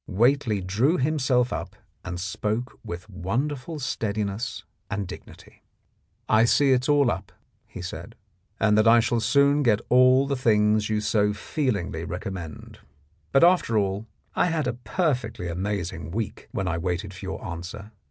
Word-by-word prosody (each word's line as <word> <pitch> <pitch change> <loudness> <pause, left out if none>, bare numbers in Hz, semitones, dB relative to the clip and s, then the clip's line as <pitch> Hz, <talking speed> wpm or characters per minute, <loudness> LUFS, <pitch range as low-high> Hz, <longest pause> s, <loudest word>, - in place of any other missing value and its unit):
Whately 115 0 +2
drew 110 - +1
himself 130 -3 +1
up - - -5 0.3
and 90 -1 -5
spoke 105 +6 -3
with 85 +3 -7
wonderful 130 - -3
steadiness 110 -5 -3 0.3
and 105 -2 -3
dignity. - - -12 0.3
" - - -43 0.3
I 110 +1 +5
see 140 +3 +4
it's 130 +2 +2
all 145 -4 +4
up! 95 -3 -5 0.2
" - - -43
he - - -8
said, - - -7 0.4
"and 105 0 +3
that 110 - +4
I 115 +1 +7
shall 120 +1 +1
soon 140 +4 +3
get 110 -6 +3
all 130 +2 +6
the 140 0 -1
things 105 -3 +2
you 105 -1 0
so 105 0 +2
feelingly 105 - -2
recommend. 90 -1 -7 0.5
But 135 - +5
after 175 -10 +4
all 100 +2 -1 0.3
I - - +2
had 160 -3 0
a - - 0
perfectly 125 - -2
amazing 90 -2 -3
week 110 +4 -4
when 95 - -2
I 85 -1 -1
waited 90 +3 -3
for 95 - -11
your 95 +2 -5
answer. 95 +4 -7
110 Hz, 160 wpm, -25 LUFS, 95-130 Hz, 0.5 s, I